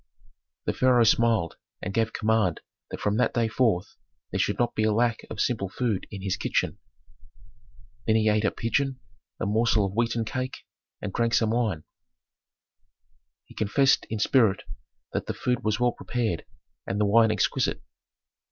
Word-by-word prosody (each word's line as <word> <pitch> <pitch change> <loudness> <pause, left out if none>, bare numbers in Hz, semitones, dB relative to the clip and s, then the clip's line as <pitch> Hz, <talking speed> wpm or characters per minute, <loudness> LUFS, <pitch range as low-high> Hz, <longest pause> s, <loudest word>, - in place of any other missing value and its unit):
The - - 0
pharaoh 125 -2 +4
smiled 110 -6 +2 0.2
and 95 - -5
gave 115 +1 +1
command 110 -6 +1 0.3
that - - -6
from 105 +1 0
that 125 - +1
day 115 -2 +2
forth 110 -6 0 0.3
there - - -2
should - - +1
not 120 - +1
be - - -1
a 110 0 +3
lack 115 +1 +2
of 110 - -7
simple 105 -6 0
food 110 -2 -2
in 100 -2 -8
his 95 -2 -1
kitchen. - - -1 1.3
Then 110 - +4
he 110 -1 +3
ate 105 0 +3
a 105 - +3
pigeon, 130 +5 -1 0.4
a - - -1
morsel 110 0 +2
of 95 - -4
wheaten 115 +1 0
cake, 130 +3 -4 0.4
and 100 -2 -4
drank 115 0 +1
some 110 -1 +2
wine. 110 -9 0 1.6
He - - -16
confessed 135 +6 +2
in 110 - -2
spirit 110 -2 +3 0.5
that - - -2
the - - -3
food 125 -1 -1
was 105 -1 0
well 125 0 +3
prepared 115 -8 -3 0.4
and 100 - -2
the 105 - +3
wine 110 +2 +5
exquisite. 110 -2 0
110 Hz, 165 wpm, -26 LUFS, 105-120 Hz, 1.6 s, wine